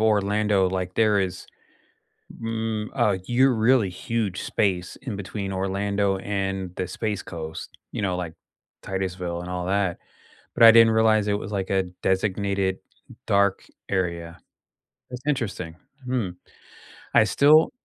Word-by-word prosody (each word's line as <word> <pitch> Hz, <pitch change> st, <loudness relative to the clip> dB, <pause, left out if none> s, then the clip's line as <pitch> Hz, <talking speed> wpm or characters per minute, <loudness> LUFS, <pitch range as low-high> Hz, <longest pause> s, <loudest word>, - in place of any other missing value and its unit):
Orlando, 105 Hz, -2 st, +2 dB
like, 90 Hz, -1 st, -3 dB
there 105 Hz, -2 st, +3 dB
is, 95 Hz, -1 st, -3 dB, 1.0 s
mm, 110 Hz, -1 st, -2 dB
uh 105 Hz, -7 st, +2 dB
you're 130 Hz, +1 st, +4 dB
really 110 Hz, -3 st, +3 dB
huge 105 Hz, 0 st, -3 dB
space 90 Hz, -3 st, -1 dB
in 125 Hz, -6 st, -4 dB
between 100 Hz, 0 st, -5 dB
Orlando 100 Hz, +1 st, 0 dB
and 95 Hz, -2 st, -3 dB
the 90 Hz, -, -2 dB
Space 105 Hz, +1 st, -3 dB
Coast, 80 Hz, -1 st, -7 dB, 0.2 s
you -, -, -3 dB
know, 95 Hz, -3 st, 0 dB
like, 85 Hz, -3 st, -5 dB, 0.5 s
Titusville 90 Hz, -2 st, -3 dB
and 90 Hz, -, -7 dB
all 90 Hz, -1 st, -3 dB
that, 95 Hz, -2 st, 0 dB, 0.6 s
but -, -, +4 dB
I 115 Hz, -, +11 dB
didn't 115 Hz, 0 st, +7 dB
realize 110 Hz, -2 st, +3 dB
it 105 Hz, -, +2 dB
was, 100 Hz, +2 st, -7 dB
like, 95 Hz, -2 st, -2 dB
a 95 Hz, -1 st, +2 dB, 0.2 s
designated 95 Hz, 0 st, 0 dB, 0.5 s
dark 100 Hz, -2 st, +2 dB, 0.2 s
area. 85 Hz, -3 st, -2 dB, 0.7 s
That's 125 Hz, +1 st, -8 dB
interesting, 100 Hz, -, -2 dB, 0.3 s
hmm, 125 Hz, -7 st, 0 dB, 0.9 s
I -, -, +7 dB
still 155 Hz, -, +5 dB
100 Hz, 135 wpm, -24 LUFS, 95-110 Hz, 1.0 s, I